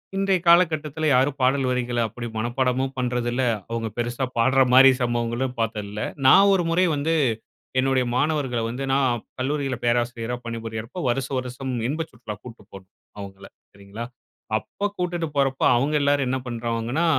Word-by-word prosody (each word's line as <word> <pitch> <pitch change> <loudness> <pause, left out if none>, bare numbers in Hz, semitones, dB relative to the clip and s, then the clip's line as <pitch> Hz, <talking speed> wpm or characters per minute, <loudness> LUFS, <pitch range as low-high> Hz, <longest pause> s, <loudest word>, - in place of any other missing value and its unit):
இன்றைய 195 -1 +2
காலகட்டத்துல 160 -3 +3
யாரும் 135 +3 +2
பாடல் 130 +1 +2
வரிகள 125 -1 -1
அப்படி 120 +2 -7
மனப்பாடமும் 130 +3 0
பண்றதில்ல, 125 0 -1 0.3
அவுங்க 115 -1 -2
பெருசா 120 +2 -1
பாடுற 130 +3 +4
மாரி 135 +1 +9
சம்பவங்களும் 120 +1 -1
பாத்தது 110 -2 -2
இல்ல. 105 +1 -6 0.3
நான் 200 +9 +7
ஒரு 185 -2 +2
முறை 180 +2 +3
வந்து, 150 +3 0 0.7
என்னுடைய 130 -1 +2
மாணவர்கள 135 -3 0
வந்து 125 +4 -4
நான் 130 -4 +1 0.2
கல்லூரில 135 0 -1
பேராசிரியரா 120 0 0
பணிபுரியறப்போ, 115 +5 -6
வருஷ 125 +1 -1
வருஷம் 130 +1 -4 0.2
இன்ப 155 +3 -1
சுற்றுலா 110 -3 -8
கூப்டு 115 -4 -11
போணும் 95 0 -12 0.3
அவங்கள, 100 -1 -9 0.3
சரிங்களா? 100 +3 -8 0.5
அப்ப 200 - -4
கூட்டிட்டு 175 -2 -2
போறப்போ, 135 -1 +1
அவங்க 140 +5 0
எல்லாரும் 140 -1 +2
என்ன 130 +1 0
பண்ருவாங்கன்னா, 120 +5 -2
125 Hz, 145 wpm, -24 LUFS, 120-140 Hz, 0.7 s, மாரி